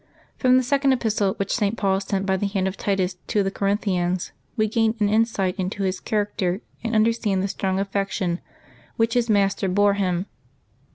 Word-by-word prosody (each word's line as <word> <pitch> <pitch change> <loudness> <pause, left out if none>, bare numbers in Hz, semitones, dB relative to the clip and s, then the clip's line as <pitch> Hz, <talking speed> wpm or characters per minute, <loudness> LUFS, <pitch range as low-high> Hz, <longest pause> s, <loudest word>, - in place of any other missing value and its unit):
From 255 -1 +4
the 255 - +3
Second 275 +1 +2
Epistle 215 -5 +1
which 200 - -2
St. 210 -1 0
Paul 195 -1 +1
sent 195 0 -2
by 190 0 +2
the 200 +2 -1
hand 195 -1 -1
of 190 - -3
Titus 190 -3 -1
to 205 - +1
the 195 - -1
Corinthians 185 -3 0 0.3
we 215 -1 +2
gain 225 0 +1
an 210 - +3
insight 210 -4 +1
into 190 +2 -2
his 185 -1 -1
character 205 -2 -1 0.2
and 230 -1 -1
un 215 0 +5
derstand 220 -4 0
the - - 0
strong 190 -1 -1
affection 195 -3 -1 0.6
which 225 0 +1
his 240 -2 +1
master 200 -1 +2
bore 205 +2 +3
him. 185 -2 0
200 Hz, 185 wpm, -23 LUFS, 190-220 Hz, 0.6 s, un